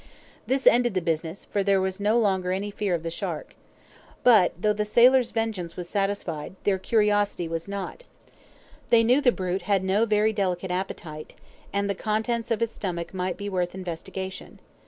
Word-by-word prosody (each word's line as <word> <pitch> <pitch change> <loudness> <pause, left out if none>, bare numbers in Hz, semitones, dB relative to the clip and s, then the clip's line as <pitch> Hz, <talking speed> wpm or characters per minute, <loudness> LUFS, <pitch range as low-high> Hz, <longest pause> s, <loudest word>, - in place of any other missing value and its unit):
This 265 +1 0
ended 240 -3 +5
the - - +3
business, 165 +1 -3
for 205 - -1
there 195 0 +3
was 190 0 -2
no 210 +3 +2
longer 190 -5 +1
any 200 +2 -2
fear 200 -3 -1
of 165 - -5
the 165 - -3
shark. - - -5 0.7
But, 210 -8 +5
though 210 +3 +2
the 210 0 -1
sailors' 245 +3 +5
vengeance 215 -7 -3
was 175 -1 -5
satisfied, 195 -5 -2
their 195 -2 +1
curiosity 205 -4 +1
was 165 +1 -4
not; 200 - -6 0.8
they 235 -1 +6
knew 250 +5 +4
the 250 - +5
brute 185 -3 -2
had 195 -2 +3
no 200 +4 +2
very 215 +1 +2
delicate 185 -3 -1
appetite, 170 -4 -5 0.4
and 200 0 0
the 200 - 0
contents 220 +3 -1
of 230 -1 0
his 230 -1 0
stomach 170 -3 -5
might 180 -1 -2
be 205 - -5
worth 180 -2 -2
investigation. 190 +1 -6
200 Hz, 180 wpm, -26 LUFS, 180-215 Hz, 0.8 s, they